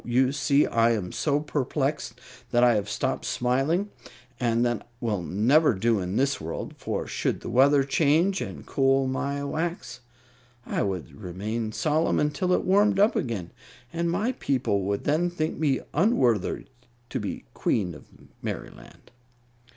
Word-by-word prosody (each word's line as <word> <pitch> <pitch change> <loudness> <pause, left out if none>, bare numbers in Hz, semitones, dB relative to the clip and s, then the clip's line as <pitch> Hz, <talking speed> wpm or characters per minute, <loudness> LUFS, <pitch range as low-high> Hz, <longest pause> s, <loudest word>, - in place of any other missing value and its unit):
You 125 +2 +2
see, 140 0 +3
I 115 0 +3
am 95 -5 -3
so 145 -2 +1
perplexed 145 -3 -2 0.3
that 120 0 +3
I 120 -1 +6
have 105 -1 -1
stopped 105 - -2
smiling, 140 +11 0 0.5
and 120 -1 +2
that 120 -3 -2
will 110 -6 -1
never 120 - +3
do 110 +2 +2
in 90 +1 -3
the 140 +3 +2
world; 80 +1 -5
for - - -3
should - - -2
the - - -6
weather 140 +2 +5
change 160 +7 +2
and 95 -12 -6
cool 135 0 +2
my 140 +2 -2
wax, 140 -4 -3 0.7
I - - -1
would 95 -6 -3
remain 105 +5 -3
solemn 155 +7 +1
until 150 +5 0
it - - +2
warmed 200 +2 +4
up 205 +3 +4
again, 105 -8 -2 0.4
and 170 0 0
my 205 +9 0
people 130 - 0
would 100 +1 -1
then 160 +4 +1
think 160 -2 -3
me 145 -4 +1
unworthy 135 - +2 0.5
to - - -1
be - - -3
the - - -16
Queen 95 -6 0
of 75 - -13 0.3
Merryland." - - -8
130 Hz, 155 wpm, -26 LUFS, 115-155 Hz, 0.7 s, I